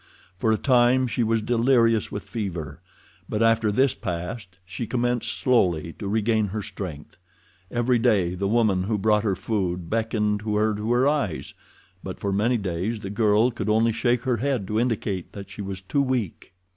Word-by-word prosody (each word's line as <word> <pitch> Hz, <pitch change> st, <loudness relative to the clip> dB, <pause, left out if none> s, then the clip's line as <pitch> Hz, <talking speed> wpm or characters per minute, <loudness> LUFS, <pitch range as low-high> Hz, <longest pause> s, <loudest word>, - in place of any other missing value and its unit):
For 110 Hz, -, +2 dB
a 110 Hz, -, +3 dB
time 125 Hz, 0 st, +3 dB
she 120 Hz, 0 st, -2 dB
was 115 Hz, -1 st, +1 dB
delirious 115 Hz, -1 st, +2 dB
with 100 Hz, -, -5 dB
fever, 85 Hz, -, -5 dB, 0.5 s
but 110 Hz, +1 st, 0 dB
after 115 Hz, -1 st, +3 dB
this 130 Hz, +5 st, +3 dB
passed 90 Hz, +2 st, -5 dB
she 110 Hz, +5 st, -5 dB
commenced 120 Hz, 0 st, 0 dB
slowly 90 Hz, -, +1 dB
to 100 Hz, -, -4 dB
regain 110 Hz, +1 st, +1 dB
her 105 Hz, +2 st, -4 dB
strength. 85 Hz, -8 st, -7 dB, 0.5 s
Every 120 Hz, 0 st, +1 dB
day 100 Hz, -7 st, +2 dB
the 100 Hz, +2 st, -2 dB
woman 105 Hz, -4 st, +2 dB
who 105 Hz, +1 st, 0 dB
brought 105 Hz, +1 st, +2 dB
her 100 Hz, -4 st, +1 dB
food 90 Hz, -4 st, -2 dB
beckoned 110 Hz, -2 st, 0 dB
to 105 Hz, 0 st, -2 dB
her 110 Hz, +1 st, +2 dB
to 105 Hz, +3 st, -3 dB
arise, 125 Hz, -, +1 dB, 0.5 s
but -, -, -6 dB
for 100 Hz, -1 st, -2 dB
many 115 Hz, +5 st, +2 dB
days 100 Hz, +3 st, -3 dB
the 95 Hz, -, -5 dB
girl 110 Hz, +2 st, +3 dB
could 110 Hz, -3 st, -4 dB
only 110 Hz, +2 st, +3 dB
shake 120 Hz, +1 st, 0 dB
her 125 Hz, -3 st, +1 dB
head 130 Hz, -3 st, -1 dB
to 110 Hz, +1 st, +1 dB
indicate 110 Hz, -6 st, -2 dB
that 100 Hz, -1 st, -9 dB
she 100 Hz, -, -7 dB
was 95 Hz, -1 st, -5 dB
too 140 Hz, +9 st, 0 dB
weak. 120 Hz, -, -3 dB
110 Hz, 180 wpm, -24 LUFS, 100-120 Hz, 0.5 s, a